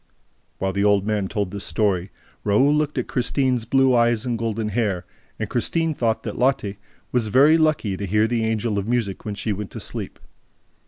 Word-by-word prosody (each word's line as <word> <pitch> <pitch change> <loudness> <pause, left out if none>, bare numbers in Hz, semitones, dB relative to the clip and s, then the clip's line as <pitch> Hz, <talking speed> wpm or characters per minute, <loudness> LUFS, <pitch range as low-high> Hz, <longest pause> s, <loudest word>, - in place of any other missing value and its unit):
While 95 0 -1
the 100 +1 0
old 100 -1 +3
man 105 -2 0
told 100 -2 -2
this 100 -1 -5
story, 100 -4 0 0.3
Raoul 120 +8 +3
looked 150 -1 0
at 125 - 0
Christine's 125 -1 0
blue 135 +2 +3
eyes 120 -1 +3
and 120 -2 -1
golden 115 -1 -2
hair; 100 -5 -1 0.3
and - - -3
Christine 165 -1 0
thought 115 -5 -1
that - - -5
Lotte 125 -6 +1 0.4
was 120 -3 +1
very 140 +8 +5
lucky 155 -11 +1
to 100 +1 -4
hear 105 +3 +3
the 115 0 0
Angel 110 -1 0
of 100 - -4
Music 115 -5 -1
when 105 -1 -3
she 105 +1 -2
went 100 0 -5
to - - -8
sleep. - - -5
110 Hz, 195 wpm, -23 LUFS, 100-125 Hz, 0.4 s, very